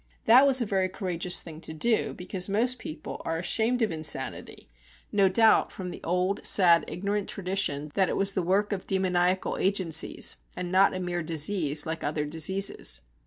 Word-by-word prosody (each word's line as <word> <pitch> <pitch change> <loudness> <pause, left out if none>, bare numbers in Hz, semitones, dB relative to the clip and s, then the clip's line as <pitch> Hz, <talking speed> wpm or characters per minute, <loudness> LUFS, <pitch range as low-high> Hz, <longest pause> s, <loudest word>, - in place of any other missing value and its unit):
That 255 +5 +7
was 265 -1 +4
a - - +1
very 190 -2 0
courageous 180 -2 -1
thing 160 -1 -10
to 160 - -7
do, 225 +7 0
because 180 +1 -5
most 240 +5 +1
people 155 - -8
are 165 - -2
ashamed 225 +7 0
of 215 - 0
insanity, 155 -4 -3 0.4
no 200 -2 +3
doubt 220 +3 +4
from 180 -2 -7
the - - -10
old 180 +3 -1
sad 170 -4 +5
ignorant 200 +2 -3
tradition 180 -7 -1
that 190 -2 +1
it - - -2
was 195 0 +2
the 190 - 0
work 195 +4 0
of 190 - -6
demoniacal 185 -1 0
agencies, 185 -5 0 0.2
and 180 -1 -5
not 190 +1 +4
a - - -3
mere 175 -1 -3
disease 155 -1 0
like 160 +1 -4
other 150 0 -2
diseases. 165 - -2
185 Hz, 175 wpm, -27 LUFS, 165-200 Hz, 0.4 s, That